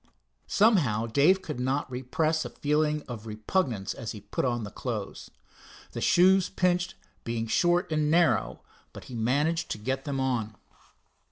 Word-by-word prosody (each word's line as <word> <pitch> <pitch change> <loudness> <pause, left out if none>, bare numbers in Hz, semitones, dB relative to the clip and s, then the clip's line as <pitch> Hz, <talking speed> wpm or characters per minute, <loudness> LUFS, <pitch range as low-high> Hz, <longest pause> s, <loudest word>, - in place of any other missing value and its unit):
Somehow, 155 - +3
Dave 150 +11 +3
could 150 -5 -5
not 130 +3 -1
repress 155 +6 -1
a - - -6
feeling 150 0 0
of 115 -3 -7
repugnance 110 - -1
as 115 - -6
he 105 - -9
put 100 +5 -3
on 120 -2 -1
the 105 - -7
clothes. - - -5 0.6
The - - -5
shoes 185 +1 +4
pinched, 180 -1 0 0.3
being 115 -1 -2
short 175 - +1
and 155 -1 +1
narrow, 170 +1 +2 0.3
but - - -10
he - - -11
managed 140 +9 0
to - - -3
get 130 +5 -3
them 140 -2 -2
on. 120 -5 -1
140 Hz, 155 wpm, -28 LUFS, 115-170 Hz, 0.6 s, shoes